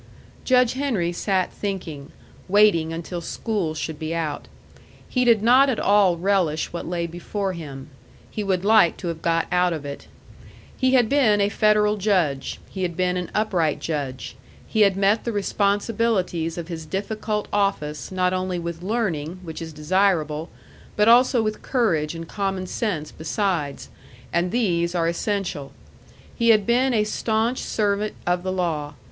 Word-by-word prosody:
Judge 250 -2 +4
Henry 245 -11 -1
sat 185 +1 -1
thinking, 165 -8 -5 0.4
waiting 195 -5 +4
until 170 +1 -5
school 185 -3 -2
should 155 -1 -4
be 160 +1 -3
out. 155 -3 -3 0.6
He 250 - +1
did 230 -4 +4
not 255 +4 +6
at 245 - 0
all 200 -4 +4
relish 175 -5 0
what 170 - -5
lay 170 0 -2
before 185 +3 -4
him. 145 -4 -8 0.4
He 215 - -3
would 190 -1 -1
like 215 -6 +5
to 175 - -4
have 165 -1 -5
got 165 0 +1
out 180 -1 +2
of 155 -3 -6
it. 140 0 -7 0.7
He 260 0 +2
had 245 -3 +4
been 225 -6 +3
a 200 0 +2
federal 210 0 +3
judge; 180 -10 0
he 190 - -7
had 175 -3 -2
been 180 0 +1
an 180 -1 -3
upright 180 -8 +1
judge; 140 -6 -4 0.3
he 220 - 0
had 200 -2 +4
met 200 +3 +2
the 235 - -2
responsibilities 200 -4 0
of 170 -2 -5
his 160 -3 -6
difficult 210 +3 -3
office 150 -9 -1
not 185 -1 +1
only 185 -1 -1
with 170 -1 -5
learning, 185 -6 -2
which 160 -1 -7
is 165 -1 -6
desirable, 160 -1 0 0.5
but 210 +1 +3
also 240 0 +5
with 215 0 -3
courage 170 - 0
and 165 0 -7
common 195 -1 -2
sense 180 -6 -3
besides, 160 -3 -2 0.5
and 170 +1 +1
these 175 -6 0
are 165 -1 +1
essential. 170 -5 -2 0.6
He 235 -1 +2
had 215 -3 +5
been 250 +4 +3
a 220 -3 +2
stanch 220 +3 0
servant 210 0 -1
of 175 0 +1
the 185 +1 -3
law. 160 -6 -2
185 Hz, 160 wpm, -23 LUFS, 165-210 Hz, 0.7 s, not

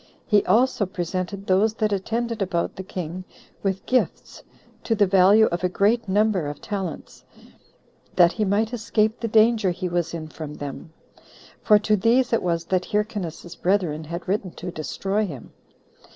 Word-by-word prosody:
He 210 -3 +3
also 225 0 +2
presented 185 +1 -4
those 205 +4 +2
that 215 -2 0
attended 230 +3 -2
about 180 -3 -1
the - - -6
king 180 -1 -6 0.4
with 195 -1 -2
gifts 255 0 -1 0.4
to 225 - 0
the 205 -1 +4
value 195 +3 +5
of 175 +1 -3
a 180 - +2
great 210 +4 +1
number 205 -5 +2
of 145 0 -6
talents, 190 -6 -6 0.9
that 175 -2 +6
he 215 - -2
might 210 +4 0
escape 220 -1 0
the 230 - -2
danger 220 -2 +4
he 180 +1 -3
was 175 -1 -2
in 160 -1 -6
from 155 -1 -8
them; 145 +2 -7 0.7
for 210 - +6
to 210 0 +2
these 235 +5 +2
it 230 - +3
was 170 -2 -1
that 180 +1 0
Hyrcanus's 205 -6 -3
brethren 175 -5 0
had 170 +3 -6
written 195 0 -1
to 180 +1 -7
destroy 195 +6 -2
him. 140 -9 -10
195 Hz, 165 wpm, -23 LUFS, 175-215 Hz, 0.9 s, that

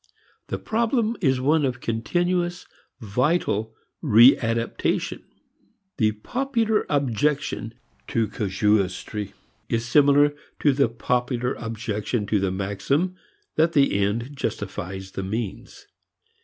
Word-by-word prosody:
The - - -3
problem 230 0 0
is 135 -6 +2
one 150 +4 +2
of 125 -3 -1
continuous, 175 - -1 0.4
vital 110 - 0 0.3
readaptation. 115 0 +3 0.8
The 110 -3 +2
popular 225 - -1
objection 140 -3 0 0.3
to 115 -2 0
casuistry 105 0 -1 0.4
is 115 0 0
similar 145 +3 +5 0.3
to 145 - +4
the 140 -3 +2
popular 125 +2 -1
objection 110 -1 -3
to 105 0 +1
the 95 0 0
maxim 100 - -1 0.4
that 165 +1 +3
the 140 -2 +4
end 110 +7 -1
justifies 95 -5 -4
the 95 - -4
means. 105 +1 -5
120 Hz, 100 wpm, -24 LUFS, 105-145 Hz, 0.8 s, similar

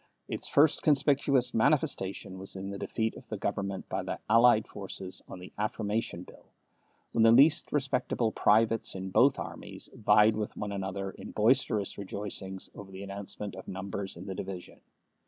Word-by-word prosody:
Its - - -3
first 150 +2 +4
conspicuous 140 -4 +3
manifestation 100 -7 0
was 95 +1 -8
in 95 +1 -5
the 100 - -6
defeat 110 -1 -2
of - - -13
the - - -3
Government 100 -1 -3
by - - -2
the - - -4
allied 115 -1 +5
forces 95 -1 -8
on - - -8
the 90 +1 -11
Affirmation 105 -3 -2
Bill, - - -16 0.7
when 115 - +1
the 115 0 +7
least 140 +6 +5
respectable 125 -5 0
privates 110 +1 +2
in 95 0 -5
both 130 +7 +5
armies - - -7
vied 105 +1 +4
with 105 -1 -4
one 105 -1 -3
another 95 0 -3
in - - -10
boisterous 110 -3 +1
rejoicings 95 -1 -5
over 100 -1 -10
the 95 +1 -8
announcement 100 0 -6
of - - -10
numbers 95 0 -5
in 90 - -9
the 95 - -4
division. 95 -1 -7
105 Hz, 165 wpm, -30 LUFS, 95-115 Hz, 0.7 s, the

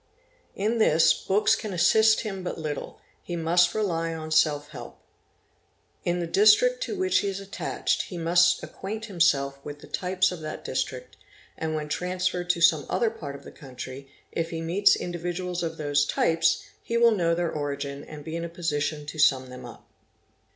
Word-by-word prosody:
In 220 +4 0
this, 165 -7 +5
books 205 +2 +2
can 210 -3 -5
assist 220 +5 +4
him 195 -4 -5
but 180 - -4
little—he 155 +2 -7
must 175 +1 +2
rely 165 -6 -1
on 155 -1 -7
self 150 -2 +2
help. - - -10 1.0
In 175 0 0
the 175 - -1
district 215 - +4
to - - -4
which 375 0 +2
he 200 - -2
is 195 0 -3
attached 195 0 -2
be 180 - -6
must 175 +1 +3
acquaint 215 +3 -6
himself 140 -8 +1
with 145 0 -7
the - - -13
types 185 0 0
of 180 - -6
that 155 -1 -7
district - - -4 0.4
and, 160 -1 -3
when 150 -1 -3
transferred 180 +1 -2
to 175 -1 +1
some 155 -4 +4
other 230 -2 +1
part 145 -10 -7
of 140 - -12
the - - -11
country, 135 0 -9 0.2
if 165 0 -2
he 165 - -4
meets 180 +5 +3
individuals 175 +1 -4
of 165 -1 -3
those 145 -1 +1
types, 165 0 +2 0.2
he 230 - -2
will 235 0 +6
know 170 -5 +1
their 170 -1 -1
origin 140 -1 -4
and 150 -1 -10
be 160 - -5
in 170 - -3
a 170 - -4
position 150 -3 -2
to 155 +1 -8
sum 130 -3 +3
them 125 0 -9
up. 120 - -14
170 Hz, 180 wpm, -26 LUFS, 150-190 Hz, 1.0 s, will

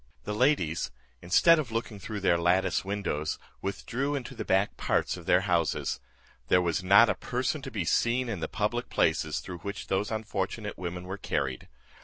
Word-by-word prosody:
The 105 - -3
ladies, 105 - +2 0.3
instead 160 - +5
of 135 -7 -3
looking 115 -2 -3
through 105 +1 -5
their 85 -3 +3
lattice 90 +2 +2
windows, 95 -7 -2 0.2
withdrew 130 +8 -2
into 130 -4 -5
the - - -5
back 95 +2 +1
parts - - 0
of 85 -2 -11
their 90 - +5
houses. 85 -5 0 0.5
There 90 - +5
was 85 0 0
not 100 +5 +7
a - - +2
person 130 +4 -2
to 135 - -6
be 105 -8 -3
seen 120 +8 +2
in 105 -6 -3
the 80 - -2
public 115 +5 -2
places 80 -1 +1
through 90 -2 -7
which 100 +2 -6
those 95 +2 0
unfortunate 105 -1 -3
women 90 0 -5
were 95 +2 -6
carried. 65 -8 -2
100 Hz, 180 wpm, -29 LUFS, 90-115 Hz, 0.5 s, not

